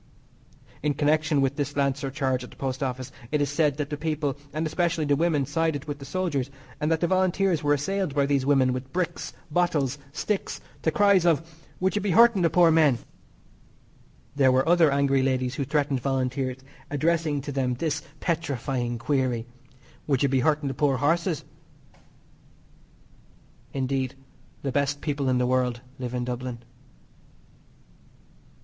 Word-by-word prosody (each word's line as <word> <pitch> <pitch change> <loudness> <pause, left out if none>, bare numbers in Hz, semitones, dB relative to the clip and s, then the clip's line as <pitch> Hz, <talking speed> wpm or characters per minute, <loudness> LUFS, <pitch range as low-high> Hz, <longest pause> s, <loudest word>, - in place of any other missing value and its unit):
In 150 -1 0
connection 150 0 +2
with 135 0 +1
this 145 -1 -2
lancer 140 0 0
charge 130 -2 -1
at 125 - -9
the - - -16
Post 130 0 -3
Office 130 -1 -3 0.2
it 150 - +2
is 145 -1 0
said 145 -1 +2
that 150 -1 -3
the 150 - -2
people, 150 -2 -1 0.2
and 155 +2 -2
especially 165 0 0
the 145 -1 +3
women, 155 -3 +1
sided 160 -1 -1
with 145 -1 -5
the 140 - -8
soldiers, 145 -5 -1 0.3
and 150 +2 0
that 160 - +1
the 170 - +2
Volunteers 185 -2 +2
were 145 -1 +3
assailed 175 +2 -2
by 140 -1 +3
these 140 -1 +1
women 130 -2 +3
with 130 +1 -6
bricks, 175 0 -2 0.2
bottles, 150 -5 +1
sticks, 200 +6 -2 0.2
to - - +2
cries 200 0 +4
of: 165 -1 +2 0.3
"Would 190 +1 +1
you 210 - +1
be 205 - -1
hurting 230 0 +6
the 170 - +4
poor 170 +1 +5
men?" 155 -6 +4 1.4
There 135 -2 +5
were 130 +3 +2
other 170 -2 +5
angry 140 -1 +2
ladies 130 -1 0
who 140 - -2
threatened 140 -1 0
Volunteers, 130 0 -1 0.3
addressing 155 0 +1
to 145 - -5
them 130 -2 0
this 155 +2 -1 0.2
petrifying 135 -7 -2
query: 125 -2 0 0.6
"Would 140 -2 +2
you 140 - +3
be 130 0 +2
hurting 150 +2 +1
the 135 - -2
poor 140 -2 +1
horses?" 165 +3 +1 2.3
Indeed, 130 -1 -1 0.5
the 135 - -1
best 140 +1 0
people 145 -3 -1
in 130 - +2
the 125 - +2
world 125 -1 +1 0.2
live 125 -1 -4
in 125 0 -1
Dublin. 125 -1 -5
145 Hz, 165 wpm, -26 LUFS, 130-160 Hz, 2.3 s, hurting